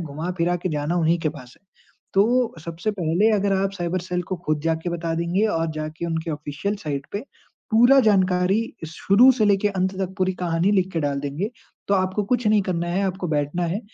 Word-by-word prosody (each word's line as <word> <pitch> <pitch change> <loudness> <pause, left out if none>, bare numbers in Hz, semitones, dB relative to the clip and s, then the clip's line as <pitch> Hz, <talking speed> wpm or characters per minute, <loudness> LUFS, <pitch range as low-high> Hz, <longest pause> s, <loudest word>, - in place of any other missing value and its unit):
घुमा-फिरा 170 +3 -2
के 175 +1 -3
जाना 150 +3 -1
उन्हीं 170 0 +2
के 160 - 0
पास 130 -5 -10
है। - - -46 0.5
तो 235 +5 +3
सबसे 170 +5 -3
पहले 175 +7 +2
अगर 200 0 +1
आप 195 0 -1
साइबर 180 -1 -2
सेल 180 0 -3
को 185 - -1
खुद 155 -1 0
जाके 165 +1 -1
बता 165 -1 -2
देंगे 170 +5 0
और 165 -6 0
जाके 155 +2 -4
उनके 160 0 -3
ऑफ़िशियल 150 +7 -4
साइट 140 -2 -3
पे 205 - -2 0.5
पूरा 240 +5 +6
जानकारी 185 +1 +2 0.3
शुरू 200 +10 +5
से 235 -4 +1
लेके 205 0 +3
अंत 190 -1 -1
तक 190 0 -3
पूरी 185 0 +1
कहानी 170 +3 +1
लिख 190 -2 +1
के 165 - -1
डाल 140 -2 -1
देंगे। 145 +9 -3 0.4
तो 200 - +3
आपको 190 +2 0
कुछ 245 -2 -2
नहीं 210 -1 +4
करना 175 -3 -2
है, 180 +3 0
आपको 185 -1 -3
बैठना 150 +3 -1
है, 205 - -2
180 Hz, 200 wpm, -23 LUFS, 160-195 Hz, 0.5 s, पूरा